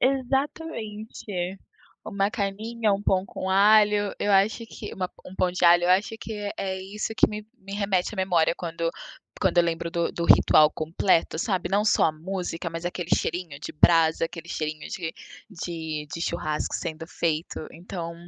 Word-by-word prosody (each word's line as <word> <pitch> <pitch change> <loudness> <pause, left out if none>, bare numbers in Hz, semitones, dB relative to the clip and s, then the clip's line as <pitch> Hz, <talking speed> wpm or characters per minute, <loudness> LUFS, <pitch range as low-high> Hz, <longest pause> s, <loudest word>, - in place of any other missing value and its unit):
Exatamente. 230 - -2 0.5
Uma 200 +1 0
carninha, 215 +1 -1
um 200 +1 -1
pão 190 -2 +2
com 190 - -5
alho, 205 +1 +5
eu 205 - 0
acho 210 +4 +3
que - - -8
uma 185 -1 -3 0.2
um 185 - -10
pão 185 -1 +1
de 180 0 -1
alho. 175 0 +7
Eu 180 - +3
acho 195 +4 +3
que 225 - -6
é 205 -1 -4
é 190 -1 -3
isso 210 +3 -4
que - - +5
me 210 0 -6
me 195 +1 -10
remete 200 -2 0
à - - -11
memória 175 -4 +2
quando 165 -1 -2 0.5
quando 190 -2 +2
eu 175 - +6
lembro 170 0 -2
do 170 -1 -1
do 170 - -3
ritual 155 0 +6
completo, 165 +1 +1
sabe? 185 0 -1
Não 200 +1 +3
só 215 - +4
a 155 - +3
música, 175 +1 -4
mas 165 +1 -6
aquele 175 0 -3
cheirinho 165 -4 -3
de - - -6
brasa, 165 0 +4
aquele 170 0 -10
cheirinho 155 -2 -4
de 165 -3 -4 0.4
de 160 -4 -5
de 170 - -5
churrasco 155 -3 -2
sendo 160 -1 -4
feito, 165 -1 -2
então, 170 -1 -6
185 Hz, 175 wpm, -26 LUFS, 165-205 Hz, 0.5 s, alho